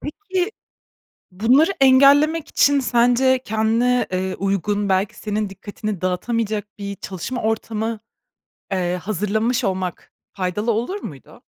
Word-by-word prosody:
Peki, 375 +4 -3 0.8
bunları 250 - +3
engellemek 280 +4 +5
için 285 0 +3
sence 250 +1 +3
kendine, 225 +3 +1
eee, 185 0 -2
uygun, 200 +1 -1
belki 190 +1 +1
senin 210 -1 -3
dikkatini 205 0 -6
dağıtamayacak 210 +3 -1
bir 200 0 -5
çalışma 195 +8 -5
ortamı, 220 0 -2 0.7
eee, 180 -1 0
hazırlamış 215 +5 0
olmak 185 -2 -3 0.2
faydalı 200 +4 -1
olur 245 - -2
muydu? 135 -6 -10
220 Hz, 110 wpm, -21 LUFS, 195-250 Hz, 0.8 s, engellemek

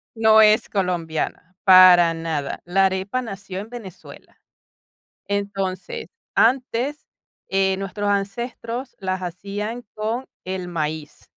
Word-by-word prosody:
no 220 -1 +6
es 215 0 +4
colombiana, 175 -2 -2
para 185 -3 +8
nada. 160 -4 -3
La 195 +2 +3
arepa 190 +6 -1
nació 195 -4 -7
en 210 - -8
Venezuela. 225 -7 -12 0.9
Entonces, 200 - -3 0.3
antes, 255 +3 +1 0.4
eh, 190 0 +2
nuestros 195 +1 -3
ancestros 230 +5 -3
las 185 -1 -3
hacían 200 +6 -5
con 225 +4 -3 0.2
el 185 -1 -4
maíz. 155 -2 -4
195 Hz, 105 wpm, -22 LUFS, 185-220 Hz, 0.9 s, para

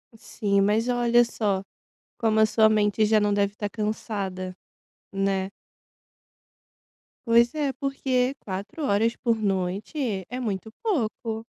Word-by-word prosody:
Sim, 200 -2 0
mas 210 +4 +2
olha 240 -1 +4
só 205 -4 -1 0.6
como 220 -1 +2
a 220 - +6
sua 220 0 +4
mente 210 0 +2
já 215 0 +4
não 205 -1 +2
deve 200 0 +1
tá 205 - -3
cansada, 200 -4 -3 0.6
né? 195 -1 0 1.8
Pois 235 +1 +5
é, 290 -3 0
porque 265 -1 0
4 200 +10 -5
horas 225 0 +1
por 235 -2 +1
noite 200 - -2
é 250 - -4
muito 220 -3 -3
pouco. 230 - -2
215 Hz, 125 wpm, -25 LUFS, 200-235 Hz, 1.8 s, a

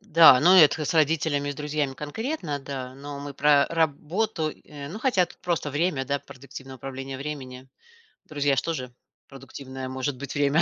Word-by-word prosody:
да, 165 -10 +7
но 180 +5 +6
это 155 -1 +6
с - - -1
родителями 155 -2 +1
и - - -1
с - - -11
друзьями 150 -1 -2
конкретно, 155 - -4
да, 130 -2 -6
но 140 +1 -7
мы 145 0 -6
про 145 0 +4
работу. 165 +3 -1
Э, 145 -2 -9
ну, 190 +8 -7
хотя 225 -7 +2
тут 175 - -16
просто 170 -4 -2
время, 145 -1 0
да, 140 +1 -1
продуктивное 135 -1 -11
управление 135 +1 -6
временем. 130 -2 -7 0.6
Друзья 145 -2 0
ж 125 - +1
тоже 130 -7 -4 0.3
продуктивное 135 -1 -8
может 130 +1 -3
быть 140 0 -6
время. 145 +2 +3
145 Hz, 175 wpm, -25 LUFS, 135-160 Hz, 0.6 s, да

